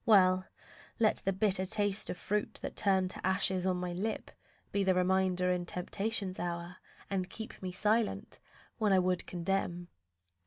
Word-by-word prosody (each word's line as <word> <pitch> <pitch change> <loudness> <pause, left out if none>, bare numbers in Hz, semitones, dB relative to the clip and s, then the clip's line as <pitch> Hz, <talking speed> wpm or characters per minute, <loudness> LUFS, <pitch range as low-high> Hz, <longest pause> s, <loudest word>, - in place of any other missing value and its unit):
Well, 185 -3 +5 0.5
let 220 -2 +3
the 195 - +3
bitter 190 -1 +2
taste 205 +1 0
Of - - -3
fruit 210 +4 -1
that - - -4
turned 190 -2 +2
to - - -7
ashes 190 0 +2
on 185 -1 +1
my 180 -1 -3
lip 210 +5 -3 0.4
Be 200 - +1
my 190 -1 +4
reminder 185 0 +2
in 175 -1 -1
temptation's 195 +2 -2
hour, 175 +1 -4 0.3
And 185 -1 -1
keep 220 +3 -8
me 185 -1 -3
silent 210 +4 0 0.4
when 210 -3 +3
I - - +6
would 180 -1 +1
condemn. 175 -1 -2
190 Hz, 160 wpm, -32 LUFS, 180-200 Hz, 0.5 s, I